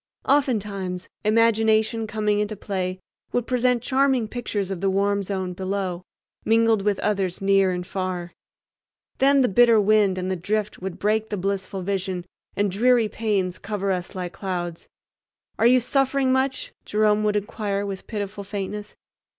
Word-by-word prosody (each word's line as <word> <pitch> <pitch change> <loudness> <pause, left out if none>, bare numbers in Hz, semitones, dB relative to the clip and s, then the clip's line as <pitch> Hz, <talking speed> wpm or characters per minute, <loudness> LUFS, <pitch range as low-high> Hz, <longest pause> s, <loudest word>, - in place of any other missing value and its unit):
Oftentimes 205 -10 0
imagination 220 0 +3
coming 210 -1 0
into 210 +1 -1
play 185 -2 -3 0.3
would 245 -1 0
present 250 -1 +1
charming 265 -3 +2
pictures 210 -4 -3
of 185 -2 -4
the 195 - +2
warm 200 +1 +1
zone 190 -2 -3
below, 185 -1 -3 0.4
mingled 225 -1 +3
with 205 -1 +1
others 195 -4 0
near 195 -1 +3
and 180 -1 -3
far. 185 -2 -4 0.9
Then 275 +1 +5
the 250 - +4
bitter 230 +2 +5
wind 205 -2 +3
and 185 0 -2
the - - 0
drift 210 +4 -2
would 190 -1 -5
break 215 +1 0
the 205 - -2
blissful 195 0 -3
vision 185 -2 -2 0.3
and 205 -1 +1
dreary 235 +2 +3
pains 200 -5 -1
cover 200 -1 -2
us 180 +1 -3
like 180 -1 -4
clouds. 175 -4 -4 0.7
"Are 230 - +5
you 255 +1 +6
suffering 270 +1 +1
much?" 270 - 0
Jerome 210 0 +2
would 210 0 +1
inquire 205 -1 -2
with 195 -1 -6
pitiful 205 -2 -4
faintness. 205 +1 -5
205 Hz, 150 wpm, -24 LUFS, 190-225 Hz, 0.9 s, you